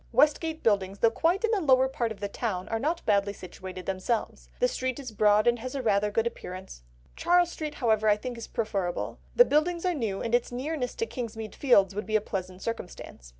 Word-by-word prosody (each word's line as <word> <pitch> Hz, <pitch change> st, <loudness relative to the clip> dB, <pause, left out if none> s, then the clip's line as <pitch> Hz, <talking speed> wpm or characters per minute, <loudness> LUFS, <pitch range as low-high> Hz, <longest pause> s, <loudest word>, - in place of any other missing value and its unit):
Westgate 305 Hz, +5 st, +2 dB
Buildings, 200 Hz, -3 st, +1 dB
though 225 Hz, +2 st, +4 dB
quite 345 Hz, -, +1 dB
in 455 Hz, -, +2 dB
the 420 Hz, -4 st, +1 dB
lower 265 Hz, -4 st, +5 dB
part 240 Hz, -3 st, -2 dB
of 210 Hz, -, -7 dB
the 200 Hz, -, -1 dB
town, 200 Hz, -3 st, -3 dB
are 225 Hz, -, -1 dB
not 325 Hz, +7 st, -1 dB
badly 200 Hz, -1 st, +2 dB
situated 185 Hz, -1 st, -9 dB
themselves. 195 Hz, +4 st, -2 dB
The -, -, +4 dB
street 260 Hz, -, -2 dB
is 265 Hz, -4 st, -7 dB
broad 210 Hz, 0 st, +4 dB
and 240 Hz, 0 st, +3 dB
has 255 Hz, +4 st, -5 dB
rather 210 Hz, -5 st, +2 dB
a -, -, -4 dB
good 225 Hz, +2 st, +1 dB
appearance. 185 Hz, -, -6 dB, 0.3 s
Charles 350 Hz, -1 st, +3 dB
Street, 305 Hz, -3 st, -5 dB
however, 220 Hz, -3 st, +2 dB
I 205 Hz, -, +4 dB
think 245 Hz, +3 st, -5 dB
is 230 Hz, -, -7 dB
preferable. 195 Hz, -5 st, -2 dB, 0.2 s
The -, -, +8 dB
buildings 335 Hz, +2 st, +1 dB
are 360 Hz, -, +2 dB
new, 220 Hz, -, -2 dB
and 230 Hz, -, -3 dB
its 240 Hz, 0 st, +2 dB
nearness 255 Hz, +1 st, -3 dB
to 455 Hz, -, -1 dB
Kingsmead 225 Hz, -, -6 dB
Fields 200 Hz, -8 st, +4 dB
would 210 Hz, +2 st, -4 dB
be 215 Hz, -, -1 dB
a -, -, +6 dB
pleasant 185 Hz, -2 st, -5 dB
circumstance. 180 Hz, -, -6 dB
230 Hz, 215 wpm, -28 LUFS, 200-280 Hz, 0.3 s, The